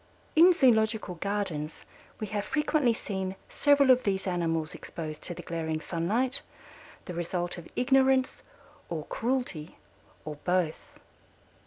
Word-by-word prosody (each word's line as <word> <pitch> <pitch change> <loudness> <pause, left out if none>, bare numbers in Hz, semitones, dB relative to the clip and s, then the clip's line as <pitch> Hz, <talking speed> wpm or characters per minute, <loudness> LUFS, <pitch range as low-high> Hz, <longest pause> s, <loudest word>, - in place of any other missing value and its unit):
In 340 +3 +8
zoological 220 - +3
gardens 175 -5 -3 0.3
we 215 - -2
have 205 0 -2
frequently 300 -2 +2
seen 190 -4 -3
several 285 -2 +5
of 255 0 +4
these 195 -1 0
animals 165 -4 -1
exposed 155 -2 -7
to 175 - -4
the - - -8
glaring 160 -2 -2
sunlight, 215 - 0 0.6
the 180 - -6
result 175 +1 -2
of 165 - -12
ignorance 265 0 +3 0.5
or 160 -3 -4
cruelty, 230 -11 -2 0.5
or 150 -1 -5
both. 175 0 -1
190 Hz, 125 wpm, -29 LUFS, 165-250 Hz, 0.6 s, In